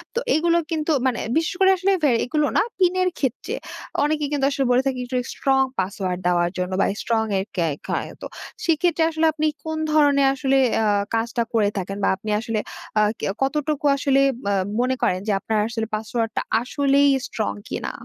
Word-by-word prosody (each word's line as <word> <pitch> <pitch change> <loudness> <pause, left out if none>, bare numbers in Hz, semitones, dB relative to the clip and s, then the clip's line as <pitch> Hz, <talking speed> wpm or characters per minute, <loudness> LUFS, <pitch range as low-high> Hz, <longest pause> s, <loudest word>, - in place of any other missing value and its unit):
তো - - +2 0.2
এগুলো 335 +2 +3
কিন্তু 315 0 0
মানে 255 -3 +1 0.2
বিশেষ 325 +2 0
করে 385 0 +6
আসলে 380 +2 +1
ভে 290 - +5
এগুলো 300 +3 +1
না - - +5
পিন 365 -2 +3
এর 365 - +3
ক্ষেত্রে 280 - -2 0.5
অনেকে 300 0 0
কিন্তু 285 -2 +1
আসলে 275 -1 -1
বলে 245 - +4
থাকে 265 -2 -1
একটু 250 +1 -3 0.2
স্ট্রং 270 -1 +2 0.2
পাসওয়ার্ড 185 -1 -2
দেওয়ার 175 -1 +2
জন্য 180 +1 -2
বা - - +4 0.2
স্ট্রং 225 -1 +1 0.2
এ - - 0
কে 170 -3 +1 0.2
হ - - -1 0.3
তো - - -5 0.4
সেক্ষেত্রে 330 0 +2
আসলে 320 0 +1
আপনি 310 0 0 0.2
কোন 315 0 -3
ধরনের 285 -2 +4
আসলে 270 0 +1 0.3
আ - - +1 0.3
কাজটা 235 +1 0
করে 215 -3 +3
থাকেন 195 +1 -4
বা - - +3
আপনি 200 +3 -8
আসলে 225 0 -2 0.4
আ - - +5 0.2
কে - - -3 0.2
কতটুকু 295 +2 -1
আসলে 275 -1 +2 0.2
বা 200 0 0 0.3
মনে 255 +1 +1
করেন 180 - +1
যে - - +2
আপনার 220 +2 -1
আসলে 225 -1 -3
পাসওয়ার্ডটা 225 +1 -2 0.2
আসলেই 280 +3 +2 0.2
স্ট্রং 215 - -2 0.2
কিনা? - - -3
270 Hz, 185 wpm, -22 LUFS, 220-305 Hz, 0.5 s, করে